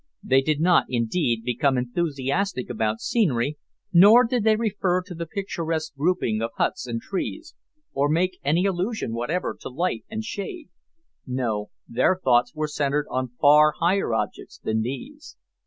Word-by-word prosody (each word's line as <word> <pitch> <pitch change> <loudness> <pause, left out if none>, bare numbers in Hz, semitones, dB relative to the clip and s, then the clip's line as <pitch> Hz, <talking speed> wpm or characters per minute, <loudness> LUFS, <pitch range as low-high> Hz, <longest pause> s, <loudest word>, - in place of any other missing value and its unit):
They 135 +1 +4
did 150 +1 0
not, 175 +2 +4
indeed, 120 0 0
become 125 +3 +1
enthusiastic 140 +3 -2
about 110 -1 -1
scenery, 150 - 0 0.3
nor 205 +8 +8
did 240 -1 0
they 220 0 +4
refer 195 -5 0
to 180 0 -9
the 170 0 -5
picturesque 165 -4 -3
grouping 140 -8 0
of 115 - -1
huts - - -1
and 115 -1 -3
trees, 315 - -5 0.4
or 140 +1 +1
make 180 +4 0
any 165 +7 +2
allusion 190 - -1
whatever 135 +11 -2
to - - -6
light 145 -2 -2
and 220 0 -4
shade; 230 - -6 0.6
no, 120 -5 -2 0.2
their 130 +10 +2
thoughts 125 -6 +2
were 155 0 -1
centred 150 0 -1
on 130 0 -1
far 150 +1 +6
higher 180 -3 +1
objects - - -4
than 110 0 -1
these. 260 - -7
155 Hz, 155 wpm, -24 LUFS, 125-185 Hz, 0.6 s, nor